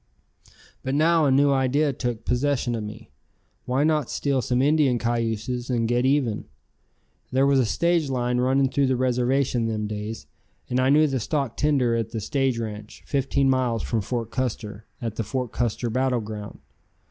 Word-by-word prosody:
But 130 +1 -2
now 160 +1 +4
a - - +3
new 140 +1 +4
idea 135 +2 +2
took 120 -3 -4
possession 125 0 0
of 115 - -2
me. 105 +2 -9 0.5
Why 130 +3 +1
not 155 -4 +1
steal 140 -2 0
some 125 0 0
Indian 145 -2 +3
cayuses 115 +1 -2
and 115 -2 +1
get 120 +2 +2
even? 135 -6 +1 0.9
There 135 +1 +3
was 140 -1 +4
a 125 - +2
stage 170 +2 +1
line 125 -1 0
running 135 +2 +3
through 140 +1 +1
the 130 - +2
reservation 125 -1 +1
them 110 -1 -2
days, 105 +1 -5 0.4
and 125 - 0
I 130 +1 +3
knew 150 +2 +5
the 135 -3 0
stock 135 +1 -2
tender 135 -6 +2
at 115 -1 -1
the 110 - -2
stage 135 +3 0
ranch, 105 -2 -7
fifteen 140 0 +1
miles 130 -3 +1
from 115 -2 -1
Fort 115 +2 -3
Custer, 110 -4 -4
at 115 -3 -5
the 115 - 0
Fort 125 +3 -3
Custer 120 0 -1
battle 130 0 +1
ground. 105 -1 -7
125 Hz, 175 wpm, -24 LUFS, 115-135 Hz, 0.9 s, knew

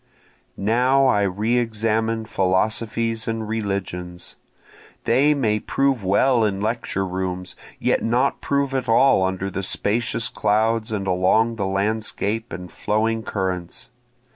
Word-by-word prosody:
Now 125 +6 +3
I 115 -6 +3
re 105 +5 +1
examine 110 0 -1
philosophies 110 +3 0
and 115 -1 -2
religions, 95 -5 -4 0.7
They 140 +6 +3
may 110 -6 +1
prove 135 -1 0
well 115 +6 +3
in 100 -2 0
lecture 110 -2 -2
rooms, 90 -1 -4 0.2
yet - - +1
not 125 +4 +1
prove 140 -1 0
at 130 -3 -2
all 130 -1 +5
under 95 +1 -2
the 95 - -3
spacious 115 +4 -1
clouds 110 -1 0
and 100 -2 -2
along 95 +5 +2
the 100 -3 -1
landscape 110 +2 -1
and 90 -1 -7
flowing 110 +2 0
currents. 95 -5 -4
110 Hz, 125 wpm, -22 LUFS, 95-115 Hz, 0.7 s, all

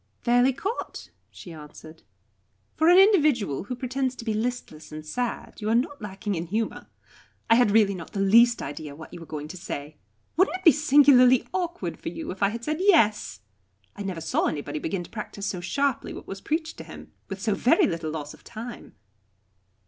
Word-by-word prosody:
"Fairly 245 +2 +4
caught," 390 - -5 0.2
she 175 - -11
answered. 155 +1 -12 0.7
"For 320 +1 +3
an 355 - +7
individual 300 - +4
who 250 - -4
pretends 255 +1 -2
to 235 - -9
be 220 - 0
listless 220 -8 -4
and 155 0 -8
sad 240 +7 -4
you 210 - -2
are 225 - +3
not 260 +2 -1
lacking 205 0 -4
in 170 -1 -3
humour. 220 +5 -3 0.6
I - - +10
had 245 -2 +5
really 205 -1 +4
not 175 0 -9
the 200 - -3
least 230 +5 +5
idea 145 0 -7
what 160 +3 -12
you 175 - -8
were 165 - -11
going 150 -1 -6
to 185 - -8
say. 150 -3 -7 0.4
Wouldn't 370 +1 +3
it 370 - -19
be 330 - +9
singularly 270 -4 +5
awkward 355 -1 -3
for - - -5
you 325 -2 -6
if 185 - -10
I 200 - +4
had 230 +2 -6
said 305 +4 -1
'Yes'? 315 - +3 0.5
I - - -8
never 190 -4 -4
saw - - 0
anybody 145 0 -3
begin 175 +3 -3
to - - -13
practise 210 -2 -6
so 190 -3 -3
sharply 275 +9 -1
what - - -9
was 195 0 -8
preached 315 +1 -2
to - - -6
him - - -12 0.2
with - - -5
so - - 0
very 390 - +3
little 165 - -2
loss 150 -2 -6
of - - -18
time!" 235 +1 -9
220 Hz, 200 wpm, -25 LUFS, 175-270 Hz, 0.7 s, I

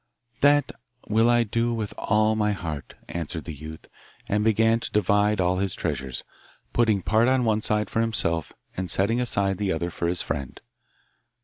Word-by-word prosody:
'That 145 +1 +4 0.4
will 110 +2 +4
I 120 0 +4
do 115 +2 0
with 110 -2 -4
all 110 +1 +2
my 105 -1 +1
heart,' 80 -7 -6
answered 80 -1 -4
the 80 - -5
youth, 80 +2 -9 0.4
and 105 +1 +1
began 115 +1 +3
to - - -5
divide 105 +1 +2
all 90 0 +2
his 95 -1 -1
treasures, 65 -2 -3 0.5
putting 110 -5 +2
part 110 +5 +3
on 130 -1 +2
one 110 -1 +2
side 105 -1 0
for 115 - 0
himself 85 -8 -1 0.2
and 90 -1 -3
setting 105 +8 +2
aside 100 -6 +1
the 100 -2 0
other 85 +1 -2
for 85 - -2
his 90 0 0
friend. 70 -2 -4
105 Hz, 175 wpm, -25 LUFS, 85-115 Hz, 0.5 s, That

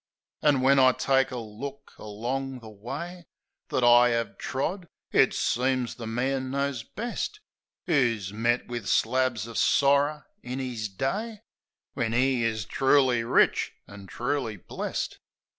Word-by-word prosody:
An' 145 -3 +3
when 135 +1 +5
I 130 -1 +6
take 135 0 +2
a 125 - -5
look 120 +5 -8
along 125 +6 -4
the 110 -1 -11
way 150 - -7 0.4
That 125 - 0
I 120 0 +6
'ave 115 - -5
trod, 175 +7 -3 0.2
it - - +5
seems 130 0 0
the 115 -2 -8
man 130 +3 -1
knows 140 -2 -1
best, 235 - -5 0.5
Who's 115 - +1
met 120 +3 +1
wiv 120 -4 -5
slabs 125 -2 +1
of 115 -1 -4
sorrer 140 +1 +3 0.2
in 125 +2 -5
'is 120 -5 -3
day, 200 - -3 0.5
When 115 -1 -1
'e 130 -1 +2
is 110 -3 -1
truly 130 +1 +3
rich 115 - +2
an' 100 -1 -11
truly 120 0 -2
blest. - - -4
130 Hz, 140 wpm, -27 LUFS, 115-140 Hz, 0.5 s, I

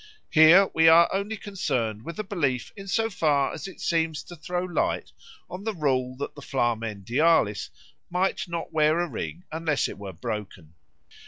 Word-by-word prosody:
Here 170 +5 +7
we 160 0 +4
are 165 +1 +8
only 200 +3 -2
concerned 120 - -2
with 170 - -6
the 215 - -3
belief 145 - -1
in 195 -1 -10
so 225 +4 +1
far 150 -9 +1
as 160 - -6
it 190 - -11
seems 160 -3 0
to 175 - -11
throw 175 +3 -3
light 180 -2 -1 0.4
on 180 +3 -8
the 220 -1 -3
rule 130 -5 0
that 140 - -5
the 145 - -11
Flamen 115 -6 -2
Dialis 130 - +2 0.4
might 190 +1 0
not 170 -1 -5
wear 155 +1 +3
a 175 - 0
ring 175 +2 -6
unless 160 -2 0
it - - -9
were 100 -1 -6
broken. 95 -4 -6
160 Hz, 175 wpm, -26 LUFS, 130-180 Hz, 0.4 s, are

